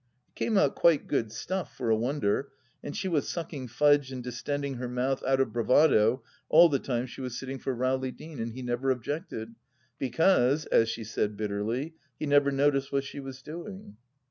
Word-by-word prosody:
It -, -, -42 dB
came 220 Hz, -, 0 dB
out 145 Hz, -7 st, +4 dB
quite 170 Hz, -4 st, +3 dB
good 115 Hz, -6 st, 0 dB
stuff, 185 Hz, -, -4 dB
for 115 Hz, -3 st, 0 dB
a -, -, +5 dB
wonder, 125 Hz, +1 st, 0 dB, 0.4 s
and 145 Hz, -, -5 dB
she 190 Hz, -, -2 dB
was 160 Hz, -6 st, 0 dB
sucking 155 Hz, -6 st, -5 dB
Fudge 145 Hz, +2 st, +3 dB
and 130 Hz, -1 st, -6 dB
distending 135 Hz, +3 st, -3 dB
her 125 Hz, 0 st, -4 dB
mouth 130 Hz, +2 st, -1 dB
out 135 Hz, 0 st, +3 dB
of 130 Hz, -5 st, +1 dB
bravado 120 Hz, -1 st, +4 dB, 0.3 s
all 170 Hz, +2 st, +8 dB
the 140 Hz, -3 st, +1 dB
time 125 Hz, -2 st, -2 dB
she 130 Hz, +1 st, -9 dB
was 125 Hz, -2 st, -4 dB
sitting 135 Hz, 0 st, -5 dB
for 130 Hz, -, -2 dB
Rowley 130 Hz, +1 st, 0 dB
Deane, 155 Hz, 0 st, -10 dB
and 115 Hz, 0 st, -3 dB
he 130 Hz, +1 st, -7 dB
never 125 Hz, +2 st, -1 dB
objected, 125 Hz, -, -3 dB, 0.5 s
because, 140 Hz, +1 st, +3 dB
as 115 Hz, -, +3 dB
she 115 Hz, 0 st, -4 dB
said 105 Hz, -1 st, -2 dB
bitterly, 110 Hz, +8 st, -2 dB, 0.2 s
he -, -, -3 dB
never 145 Hz, -1 st, +4 dB
noticed 140 Hz, 0 st, +1 dB
what 140 Hz, -1 st, +1 dB
she 140 Hz, +1 st, -8 dB
was 135 Hz, -1 st, -8 dB
doing. 175 Hz, -, -8 dB
135 Hz, 195 wpm, -28 LUFS, 120-145 Hz, 0.5 s, all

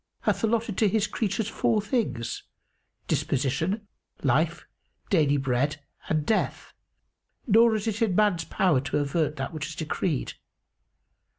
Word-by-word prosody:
hath -, -, 0 dB
allotted 225 Hz, -2 st, 0 dB
to 215 Hz, -, +4 dB
His 215 Hz, +1 st, +2 dB
creatures 210 Hz, 0 st, -1 dB
four 225 Hz, -1 st, +1 dB
things, 205 Hz, -, -2 dB, 0.7 s
disposition, 160 Hz, -, 0 dB, 0.4 s
life, -, -, +1 dB, 0.5 s
daily 150 Hz, -6 st, +4 dB
bread 135 Hz, +2 st, 0 dB, 0.3 s
and 155 Hz, -2 st, +1 dB
death; 220 Hz, -, -1 dB, 0.7 s
nor 225 Hz, 0 st, +5 dB
is 210 Hz, -1 st, -2 dB
it 220 Hz, 0 st, -2 dB
in 210 Hz, -6 st, +2 dB
man's 200 Hz, -6 st, +2 dB
power 170 Hz, -9 st, +2 dB
to 140 Hz, -, -2 dB
avert 150 Hz, +1 st, 0 dB
that 135 Hz, +1 st, -4 dB
which 155 Hz, -1 st, -4 dB
is 155 Hz, -, -7 dB
decreed. 155 Hz, -1 st, -2 dB
180 Hz, 130 wpm, -27 LUFS, 145-215 Hz, 0.7 s, nor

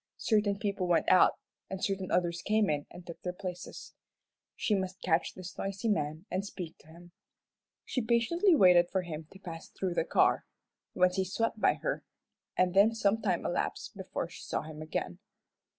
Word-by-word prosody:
Certain 210 Hz, -3 st, +2 dB
people 200 Hz, -2 st, -1 dB
went 175 Hz, -2 st, +2 dB
out, 185 Hz, -, +6 dB, 0.3 s
and 190 Hz, -1 st, -5 dB
certain 190 Hz, -2 st, -2 dB
others 175 Hz, -1 st, +1 dB
came 215 Hz, -4 st, +2 dB
in 145 Hz, -1 st, -2 dB
and 175 Hz, -, -12 dB
took 170 Hz, -, -9 dB
their 180 Hz, -, -2 dB
places. 180 Hz, -1 st, -7 dB, 0.6 s
She 215 Hz, -, 0 dB
must 190 Hz, -1 st, -1 dB
catch 165 Hz, -1 st, +1 dB
this 185 Hz, -1 st, -8 dB
noisy 195 Hz, +3 st, -2 dB
man 155 Hz, -2 st, -1 dB
and 185 Hz, +1 st, -1 dB
speak 180 Hz, -5 st, -7 dB
to -, -, -21 dB
him. 170 Hz, +2 st, -15 dB, 0.7 s
She 255 Hz, -, -1 dB
patiently 245 Hz, -, +3 dB
waited 180 Hz, -, +6 dB
for 190 Hz, -1 st, 0 dB
him 155 Hz, -2 st, -6 dB
to -, -, -12 dB
pass 170 Hz, -4 st, -8 dB
through 185 Hz, -2 st, -3 dB
the -, -, +1 dB
car. -, -, +3 dB, 0.5 s
Once 180 Hz, +1 st, +3 dB
he 190 Hz, -, +3 dB
swept 215 Hz, +3 st, -2 dB
by -, -, +4 dB
her, -, -, -3 dB, 0.5 s
and 185 Hz, -1 st, +3 dB
then 205 Hz, +4 st, +5 dB
some 220 Hz, 0 st, +2 dB
time 185 Hz, -5 st, 0 dB
elapsed -, -, -2 dB
before -, -, -4 dB
she -, -, -11 dB
saw -, -, -3 dB
him 155 Hz, 0 st, -9 dB
again. 125 Hz, -, -4 dB
185 Hz, 180 wpm, -31 LUFS, 175-205 Hz, 0.7 s, out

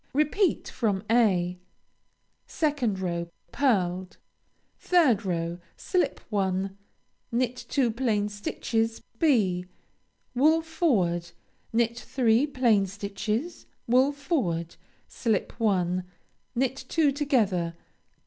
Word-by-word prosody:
Repeat 310 Hz, +5 st, +2 dB
from 205 Hz, -5 st, -1 dB
(a.) 185 Hz, -7 st, +3 dB, 0.9 s
2nd 285 Hz, -, 0 dB
row 170 Hz, -2 st, -2 dB, 0.2 s
Pearled. 185 Hz, -9 st, 0 dB, 0.7 s
3rd 265 Hz, -, +4 dB
row 170 Hz, -1 st, -2 dB, 0.2 s
Slip 365 Hz, -2 st, 0 dB
one. 190 Hz, -1 st, 0 dB, 0.6 s
Knit 245 Hz, +1 st, 0 dB
two 260 Hz, -5 st, +2 dB
plain 220 Hz, -4 st, 0 dB
stitches 225 Hz, +2 st, -2 dB, 0.2 s
(b.) 195 Hz, -, +2 dB, 0.7 s
Wool 310 Hz, +6 st, +4 dB
forward. 210 Hz, -, +1 dB, 0.4 s
Knit 235 Hz, +1 st, +1 dB
three 245 Hz, +1 st, +2 dB
plain 235 Hz, -8 st, +2 dB
stitches. 210 Hz, -, -4 dB, 0.2 s
Wool 255 Hz, +4 st, +4 dB
forward. 230 Hz, -, -2 dB, 0.3 s
Slip 220 Hz, -5 st, -1 dB
one. 185 Hz, -4 st, +1 dB, 0.5 s
Knit 265 Hz, +2 st, 0 dB
two 310 Hz, -4 st, +3 dB
together. 215 Hz, -, +1 dB
225 Hz, 90 wpm, -27 LUFS, 185-270 Hz, 0.9 s, 3rd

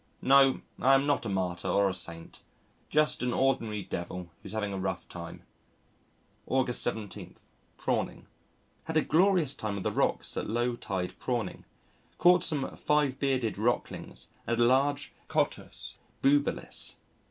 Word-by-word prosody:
No, 135 Hz, 0 st, +5 dB, 0.2 s
I 135 Hz, +1 st, +5 dB
am 135 Hz, +1 st, +3 dB
not 145 Hz, -5 st, +1 dB
a -, -, -2 dB
martyr 95 Hz, -2 st, -2 dB
or 100 Hz, +2 st, +3 dB
a 95 Hz, -, -1 dB
saint. 85 Hz, -2 st, -3 dB, 0.5 s
Just 150 Hz, 0 st, +2 dB
an 125 Hz, -1 st, 0 dB
ordinary 115 Hz, -6 st, +1 dB
devil 85 Hz, 0 st, -5 dB
who's -, -, -9 dB
having 105 Hz, -2 st, -2 dB
a 95 Hz, -, -3 dB
rough 95 Hz, -1 st, -3 dB
time. -, -, -8 dB, 1.0 s
August 130 Hz, -2 st, +2 dB
17. 110 Hz, -4 st, -3 dB, 0.4 s
Prawning -, -, -2 dB, 0.6 s
Had 160 Hz, 0 st, -1 dB
a 155 Hz, -, +4 dB
glorious 175 Hz, -3 st, +3 dB
time 105 Hz, -6 st, -4 dB
on 95 Hz, -, -4 dB
the -, -, 0 dB
rocks -, -, 0 dB
at -, -, -2 dB
low 120 Hz, +2 st, 0 dB
tide 95 Hz, -6 st, -4 dB
prawning. -, -, -3 dB, 0.5 s
Caught 180 Hz, +1 st, +6 dB
some 145 Hz, -4 st, -2 dB
Five 145 Hz, -3 st, +1 dB
Bearded 130 Hz, -7 st, 0 dB
Rocklings 120 Hz, +3 st, -2 dB, 0.2 s
and 115 Hz, 0 st, 0 dB
a -, -, +5 dB
large 140 Hz, +4 st, +2 dB, 0.2 s
Cottus -, -, -2 dB, 0.2 s
bubalis. 145 Hz, +1 st, +1 dB
125 Hz, 145 wpm, -29 LUFS, 100-140 Hz, 1.0 s, Caught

